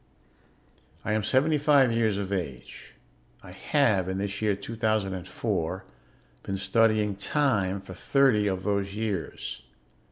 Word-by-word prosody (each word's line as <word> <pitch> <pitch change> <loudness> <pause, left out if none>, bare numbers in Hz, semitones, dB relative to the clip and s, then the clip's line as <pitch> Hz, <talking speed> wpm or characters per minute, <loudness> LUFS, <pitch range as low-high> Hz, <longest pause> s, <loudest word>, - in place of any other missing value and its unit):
"I 105 - 0
am 110 -1 0
seventy 145 +7 +2
five 140 -4 +4
years 110 -3 +1
of 100 -1 -3
age. 80 -10 -6 0.5
I 90 - -11
have, 100 - +1
in 95 - -2
this 100 +1 -3
year 105 -2 +2
2004, 95 -4 -2 0.6
been 95 - -4
studying 105 +1 +2
'time' 100 -4 0
for 95 - -10
thirty 115 0 +2
of 95 -1 -2
those 100 0 -1
years. 95 - -4
100 Hz, 125 wpm, -27 LUFS, 95-115 Hz, 0.6 s, five